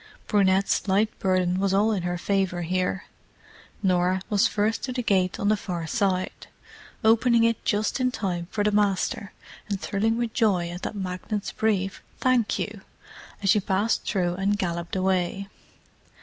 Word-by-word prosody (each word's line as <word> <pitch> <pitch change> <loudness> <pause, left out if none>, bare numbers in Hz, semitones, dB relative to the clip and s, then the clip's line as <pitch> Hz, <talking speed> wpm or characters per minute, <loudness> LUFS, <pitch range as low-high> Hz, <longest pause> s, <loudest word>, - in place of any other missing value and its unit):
Brunette's 195 -1 +2
light 205 +3 +1
burden 185 -1 +1
was 195 0 +1
all 210 +3 +3
in 200 -4 0
her 175 0 -2
favour 190 -1 0
here—Norah 185 0 -2
was 205 -1 +4
first 215 +2 0
to 255 - -3
the 250 -1 -2
gate 185 -4 +1
on 200 - 0
the 215 - +4
far 175 -5 -4
side, 185 0 -1 0.6
opening 230 +1 +4
it 230 -1 +1
just 210 +5 0
in 255 0 +2
time 180 -8 -3
for 205 - -1
the 210 - +2
"Master," 205 0 0 0.4
and 200 -2 -2
thrilling 220 +4 0
with 235 -2 -2
joy 190 -7 +2
at 175 +1 -7
that - - -4
magnate's 195 +2 -4
brief 195 -3 -1 0.2
"Thank 255 -4 +2
you!" - - -4 0.6
as 195 - +4
she 210 - +4
passed 200 +3 0
through 180 -4 0
and 200 +2 +1
galloped 170 -2 -3
away. 190 +1 0
195 Hz, 160 wpm, -25 LUFS, 185-215 Hz, 0.6 s, was